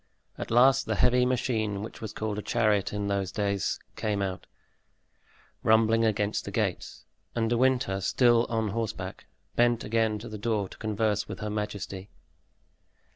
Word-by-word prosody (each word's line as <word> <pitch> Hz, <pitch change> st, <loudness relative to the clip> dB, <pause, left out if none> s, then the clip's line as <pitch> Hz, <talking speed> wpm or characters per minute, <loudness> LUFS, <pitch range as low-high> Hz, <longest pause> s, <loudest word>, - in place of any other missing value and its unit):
At -, -, -6 dB
last 130 Hz, +3 st, +5 dB
the 110 Hz, -, 0 dB
heavy 125 Hz, +3 st, +4 dB
machine, 110 Hz, -5 st, -1 dB
which 110 Hz, -, -9 dB
was 110 Hz, -2 st, -5 dB
called 105 Hz, -1 st, -3 dB
a -, -, -3 dB
chariot 105 Hz, -4 st, +1 dB
in 105 Hz, 0 st, -2 dB
those 100 Hz, -2 st, -1 dB
days, 100 Hz, -1 st, -1 dB, 0.2 s
came 105 Hz, -2 st, -1 dB
out, 95 Hz, -1 st, -4 dB, 1.1 s
rumbling 110 Hz, +1 st, +4 dB
against 105 Hz, -1 st, 0 dB
the -, -, -6 dB
gates, -, -, -3 dB, 0.3 s
and 115 Hz, 0 st, 0 dB
De -, -, +3 dB
Winter, 125 Hz, -6 st, +2 dB
still 120 Hz, +3 st, +3 dB
on 110 Hz, -2 st, 0 dB
horseback, 115 Hz, +1 st, -4 dB, 0.3 s
bent 120 Hz, -1 st, +3 dB
again 110 Hz, 0 st, +1 dB
to 110 Hz, +3 st, -8 dB
the 105 Hz, -2 st, -7 dB
door 105 Hz, -2 st, 0 dB
to -, -, -13 dB
converse 110 Hz, -1 st, 0 dB
with 100 Hz, -3 st, -7 dB
her 105 Hz, 0 st, -3 dB
majesty. 105 Hz, -2 st, -4 dB
110 Hz, 160 wpm, -28 LUFS, 105-115 Hz, 1.1 s, last